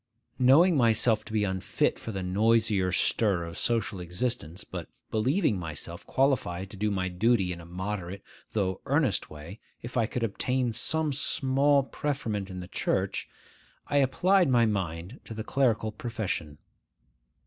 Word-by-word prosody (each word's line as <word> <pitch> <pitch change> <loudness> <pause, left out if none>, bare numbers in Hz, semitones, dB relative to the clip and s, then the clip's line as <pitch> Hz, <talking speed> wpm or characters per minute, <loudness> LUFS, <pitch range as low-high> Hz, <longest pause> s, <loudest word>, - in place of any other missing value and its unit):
Knowing 155 +8 +6
myself 115 -3 +3
to - - -12
be 110 -1 +1
unfit 95 -2 0
for 115 - -6
the 95 -2 -4
noisier 105 0 +2
stir 95 -1 +2
of 85 0 -7
social 105 -5 -1
existence, 90 0 -3
but - - -7 0.2
believing 120 - +1
myself 85 +1 -6
qualified 100 -9 0
to - - -9
do 105 +2 0
my 95 -2 -1
duty 95 0 +2
in 85 - -9
a 85 - -12
moderate, 95 +1 -5 0.3
though 95 -4 -1
earnest - - +1
way, 75 +7 -10 0.2
if 120 +2 -5
I 115 -2 +2
could 120 +1 -3
obtain 125 +3 0
some 155 +5 0
small 140 +1 +2
preferment 115 -8 -3
in 90 -1 -6
the 90 - -8
Church, - - -1 0.6
I 145 - +2
applied 175 +6 +3
my 120 -2 +4
mind 95 - -3
to 110 - -8
the 110 - -4
clerical 115 -5 +1
profession. 105 -10 -4
110 Hz, 150 wpm, -28 LUFS, 95-125 Hz, 0.6 s, Knowing